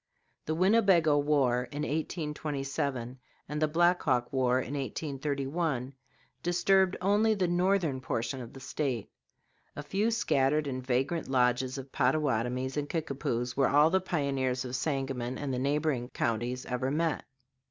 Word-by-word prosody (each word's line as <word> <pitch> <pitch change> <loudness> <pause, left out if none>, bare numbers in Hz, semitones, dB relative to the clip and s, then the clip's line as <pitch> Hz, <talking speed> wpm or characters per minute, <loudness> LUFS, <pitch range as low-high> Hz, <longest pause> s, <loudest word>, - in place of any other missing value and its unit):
The 155 - 0
Winnebago 185 -4 +4
war 135 -4 +2
in 145 +1 -3
1827 140 -5 -3 0.3
and 150 +1 -4
the 155 - +4
Black 175 +3 +3
Hawk 125 -4 0
war 130 -1 +2
in 130 +2 -4
1831 140 0 -2 0.5
disturbed 185 +2 +3
only 210 +3 +3
the 185 -3 +1
northern 175 -6 +1
portion 120 +1 -2
of 115 - -9
the 135 - -10
State. 130 -4 -3 0.6
A 145 - -5
few 195 +9 0
scattered 150 - +2
and 130 -2 -4
vagrant 135 +6 0
lodges 125 0 +1
of 135 0 -8
Pottawatomies 130 -1 0
and 145 0 -2
Kickapoos 130 -6 -2
were 135 -2 +3
all 150 +3 +5
the 190 0 +3
pioneers 135 -7 -1
of 125 0 -4
Sangamon 135 -3 -2
and 140 -2 -3
the 125 - -1
neighboring 140 -2 0
counties 120 +3 -2
ever 125 +1 -2
met. 160 +2 0
140 Hz, 140 wpm, -30 LUFS, 130-160 Hz, 0.6 s, all